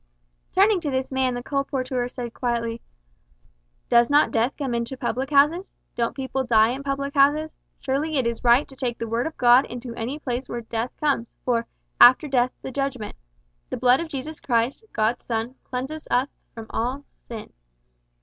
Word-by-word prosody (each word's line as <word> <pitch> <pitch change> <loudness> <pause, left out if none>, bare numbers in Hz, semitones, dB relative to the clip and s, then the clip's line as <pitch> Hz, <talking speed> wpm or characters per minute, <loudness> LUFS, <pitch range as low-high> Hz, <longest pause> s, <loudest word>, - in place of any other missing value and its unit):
Turning 395 +1 +4
to 315 -4 -3
this 260 0 -2
man 260 -1 +1
the 245 - -5
colporteur 260 -3 -2
said 240 -3 -6
quietly, 235 -2 -2 1.1
"Does 235 0 +4
not 290 +1 +4
death 235 +4 0
come 270 -5 -2
into 235 +3 -3
public 255 +1 -2
houses? 300 +6 +3 0.2
Don't 235 -1 -1
people 265 -1 -2
die 225 -3 +4
in 260 +3 -3
public 280 0 -3
houses? 295 +2 +3 0.2
Surely 290 +3 -1
it 260 - +1
is 235 -1 -2
right 245 +4 +5
to 270 - -14
take 250 -3 -2
the 230 - -4
Word 230 +4 -1
of 320 - -8
God 245 +2 +6
into 245 0 -7
any 235 +5 -4
place 255 -3 -4
where 240 - -4
death 230 +1 -3
comes, 275 -6 0
for 235 -2 +1 0.3
`after 255 +5 +8
death 255 -3 +2
the 265 - -5
judgment.' 265 -5 -3 0.5
`The - - -4
blood 250 +1 +5
of 335 - -3
Jesus 300 +2 -5
Christ, 240 - 0
God's 220 +3 0
Son, 230 +1 -2
cleanseth 270 +5 -5
us 255 +3 +2 0.3
from 225 -1 -7
all 255 +5 -2 0.2
sin.'" 225 -3 -8
255 Hz, 180 wpm, -24 LUFS, 235-280 Hz, 1.1 s, `after